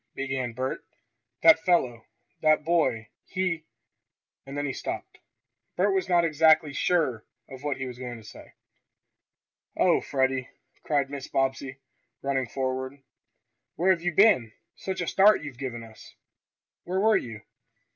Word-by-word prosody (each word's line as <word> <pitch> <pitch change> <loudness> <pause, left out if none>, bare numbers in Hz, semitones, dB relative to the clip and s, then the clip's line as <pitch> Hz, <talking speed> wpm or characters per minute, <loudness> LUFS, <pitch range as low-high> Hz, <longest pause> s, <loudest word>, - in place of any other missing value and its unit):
began 130 -3 -3
Bert. 130 +2 -3 0.6
"That 215 - +8
fellow 125 -11 +1 0.3
that 155 -1 +3
boy 130 -10 +1 0.2
he 180 -4 -2 0.4
" - - -64
and 140 +1 -7
then 145 - -1
he 135 - -2
stopped. - - -6 0.6
Bert 195 +2 +2
was 190 -1 -1
not 175 -1 +4
exactly 155 -1 +4
sure 140 -9 +1 0.2
of 130 -1 -11
what 145 -1 -2
he 130 - -4
was 125 -1 -8
going 125 -2 -6
to 110 - -14
say. - - -13 1.2
"Oh, - - +3
Freddie!" 130 -1 -1 0.3
cried 140 -2 0
Mrs. 140 -1 -7
Bobbsey, 135 0 -1 0.5
running 135 -2 0
forward. 130 +1 -4 0.7
"Where 180 +4 +3
have 170 -3 +1
you 175 0 0
been! 175 - +5 0.2
Such 190 -1 -4
a 170 - -3
start 205 +2 +5
as - - -8
you've 130 -4 -9
given 120 -4 -5
us! 110 -1 -15 0.7
Where 185 +2 -2
were 215 +2 +4
you?" 110 -3 -7
140 Hz, 150 wpm, -27 LUFS, 130-170 Hz, 1.2 s, That